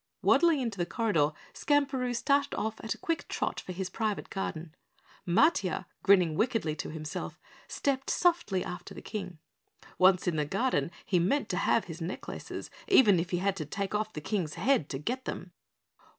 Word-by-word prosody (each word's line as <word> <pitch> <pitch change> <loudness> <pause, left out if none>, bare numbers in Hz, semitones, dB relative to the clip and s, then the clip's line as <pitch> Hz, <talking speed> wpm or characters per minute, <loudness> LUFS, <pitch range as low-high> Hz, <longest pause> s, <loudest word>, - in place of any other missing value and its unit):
Waddling 320 +1 +5
into 225 -6 -3
the 175 - +1
corridor, 205 - +2 0.2
Skamperoo 270 -4 +1
started 280 +4 +1
off 220 0 -2
at 225 - -2
a - - -16
quick 330 -1 -2
trot - - -2
for - - -7
his 185 0 -4
private 215 -1 -2
garden. 170 -6 -4 0.5
Matiah, 200 - +3 0.2
grinning 185 -5 +5
wickedly 210 -4 0
to - - -4
himself, 155 -1 -6 0.3
stepped 275 -1 -1
softly 335 - +2
after 180 - -7
the - - -9
King. 185 -5 -5 0.6
Once 185 0 +5
in 170 -3 +1
the 150 - +1
garden, 190 - 0 0.2
he 180 - +2
meant 215 +9 +1
to 180 - -1
have 215 - +2
his 165 0 -8
necklaces, 170 +3 -6 0.2
even 235 - +6
if 170 +1 -2
he 175 - 0
had 195 +2 0
to 155 - -3
take 200 +5 -3
off 215 +1 -1
the 150 - -5
King's 175 -3 -2
head 180 - +2
to 135 - -3
get 250 - -3
them. - - -5
200 Hz, 180 wpm, -30 LUFS, 175-250 Hz, 0.6 s, even